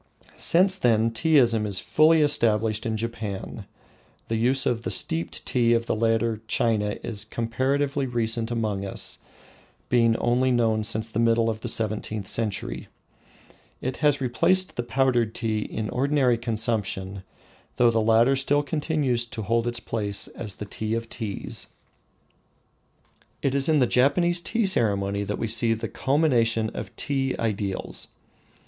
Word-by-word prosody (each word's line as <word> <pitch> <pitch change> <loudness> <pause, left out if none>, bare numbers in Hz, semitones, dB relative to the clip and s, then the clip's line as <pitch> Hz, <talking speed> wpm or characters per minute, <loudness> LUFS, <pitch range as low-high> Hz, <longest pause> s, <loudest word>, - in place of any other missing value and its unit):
Since 190 +2 +3
then 115 -3 +2
Teaism 115 -4 +3
is 100 -2 -1
fully 155 +1 +4
established 110 -5 +1
in 110 -1 -1
Japan. 110 -3 -5 0.6
The 115 - 0
use 125 +4 +2
of 115 -2 0
the - - -4
steeped 165 +1 -1
tea 120 -2 +2
of 115 0 -1
the - - -1
later 115 0 0
China 105 -3 0
is 105 -3 -4
comparatively 135 +5 -1
recent 115 -1 -1
among 110 -4 -2
us, 100 - -1 0.7
being 115 -2 +3
only 125 +2 +1
known 115 -3 +2
since 110 0 -2
the 110 - -2
middle 115 0 +3
of 110 0 -7
the - - -4
seventeenth 110 -2 -1
century. 100 - -3 0.9
It 130 0 -4
has 145 -2 +2
replaced 185 +9 +2
the - - -1
powdered 120 -2 +1
tea 110 -2 -1
in 105 0 -4
ordinary 130 -2 +2
consumption, 110 -4 -2 0.5
though 120 -1 +4
the 115 -1 +1
latter 115 +4 +4
still 145 +2 +1
continues 145 -5 0
to 110 -1 -6
hold 115 +3 0
its 120 -1 -2
place 105 -3 -3
as 105 -4 -4
the 105 - -7
tea 110 +2 -3
of 115 0 -4
teas. 105 -3 -5 1.8
It 135 - +1
is 140 +2 +1
in 155 - +4
the 130 - +4
Japanese 170 +9 +2
tea 230 +4 0
ceremony 100 - +1
that 105 +1 -3
we - - -2
see 115 +1 +1
the 110 - -4
culmination 120 -6 +1
of - - -7
tea 135 -2 -1
ideals. 100 -3 -3
115 Hz, 150 wpm, -25 LUFS, 110-130 Hz, 1.8 s, fully